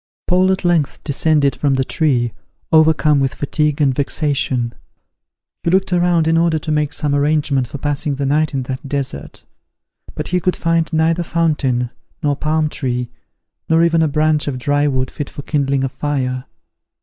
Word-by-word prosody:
Paul 185 +1 +3
at 190 -1 -2
length 165 -5 +1
descended 145 -2 +2
from 140 -2 +1
the 130 - +1
tree, 130 -9 0 0.4
overcome 155 -2 +4
with 135 -1 0
fatigue 150 +1 -1
and 140 -3 +3
vexation. 135 -4 -1 0.9
He - - -1
looked 190 +1 +2
around 175 -2 +2
in 165 0 +3
order 165 -1 +2
to 155 0 -4
make 150 -1 0
some 150 -2 -1
arrangement 145 -2 +1
for 140 - -7
passing 145 +1 -1
the 140 +1 -2
night 150 +1 +1
in 135 - -1
that 130 +2 -6
desert; 135 - -4 0.7
but - - -5
he 180 - +1
could 180 +1 0
find 165 -1 0
neither 160 +1 +2
fountain, 145 -8 0 0.3
nor 145 -1 +2
palm 155 +1 0
tree, 125 -4 -3 0.6
nor 165 +1 +4
even 165 -1 +3
a 160 - +3
branch 155 0 +1
of 135 -3 -2
dry 145 +3 +1
wood 130 -2 -1
fit 145 - -5
for 145 - -9
kindling 140 -3 0
a 135 - 0
fire. 130 -2 -2
150 Hz, 175 wpm, -18 LUFS, 135-160 Hz, 0.9 s, overcome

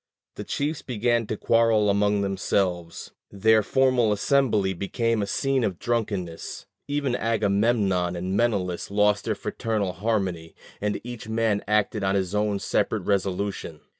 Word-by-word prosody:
The - - -7
chiefs 145 +2 -2
began 120 -1 0
to 110 - -3
quarrel 115 -2 +3
among 100 0 +2
themselves; 95 -3 -1 0.2
their 110 +2 +3
formal 130 -1 +2
assembly 105 -3 +2
became 115 +4 -1
a 100 - -2
scene 135 +5 0
of 95 -5 -1
drunkenness; 100 -8 -3 0.2
even 145 -3 -1
Agamemnon 100 -5 +1
and 90 +2 -3
Menelaus 100 -6 0
lost 105 0 +2
their - - 0
fraternal 105 -5 -2
harmony, 95 -4 -2 0.3
and 105 0 -1
each 120 -2 -8
man 110 -2 +1
acted 105 0 +1
on 95 0 +1
his 95 -1 -1
own 105 -1 +1
separate - - -1
resolution. 100 -4 -2
105 Hz, 135 wpm, -25 LUFS, 95-115 Hz, 0.3 s, quarrel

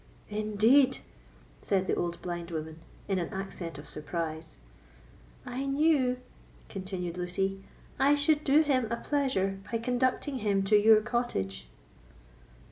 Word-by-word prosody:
"Indeed!" 215 +6 +4 0.6
said 190 -2 +1
the - - 0
old 170 -1 -2
blind 175 -1 -4
woman, 160 -1 -5 0.3
in 195 -2 +1
an 170 - -3
accent 190 -5 -5
of 145 - -10
surprise. 160 0 -5 0.9
"I 265 +3 -3
knew," 275 -3 +3 0.5
continued 185 -3 -5
Lucy, 195 +2 -2 0.4
"I 280 +2 +5
should 295 +1 +2
do 295 +2 +5
him 255 -6 +1
a - - +2
pleasure 235 -10 0
by 230 - +1
conducting 255 +3 0
him 200 -3 +1
to 205 +2 +3
your 215 +1 +7
cottage." 210 - -2
205 Hz, 125 wpm, -29 LUFS, 180-255 Hz, 0.9 s, your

